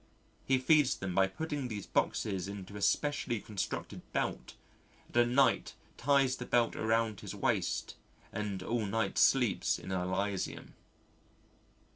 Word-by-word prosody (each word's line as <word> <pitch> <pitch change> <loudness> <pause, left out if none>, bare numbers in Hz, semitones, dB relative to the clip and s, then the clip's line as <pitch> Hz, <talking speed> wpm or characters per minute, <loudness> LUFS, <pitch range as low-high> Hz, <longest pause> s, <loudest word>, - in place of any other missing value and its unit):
He 130 - +4
feeds 145 +1 +4
them 95 -2 -4
by 95 +1 +4
putting 150 - -4
these 105 -4 -5
boxes 95 -3 0
into 100 0 -7
a 100 - -6
specially 120 +2 +1
constructed 105 -3 -4
belt - - -2 0.5
and - - -20
at 120 0 +5
night 135 +3 +2 0.2
ties 135 0 +2
the 125 - -6
belt 120 -1 +2
around 110 -1 +1
his - - -7
waist - - 0 0.4
and 100 -3 -3
all 115 +1 -1
night 110 +3 0
sleeps 125 -7 +3
in - - -8
Elysium. 95 +2 -2
110 Hz, 135 wpm, -32 LUFS, 100-130 Hz, 0.5 s, at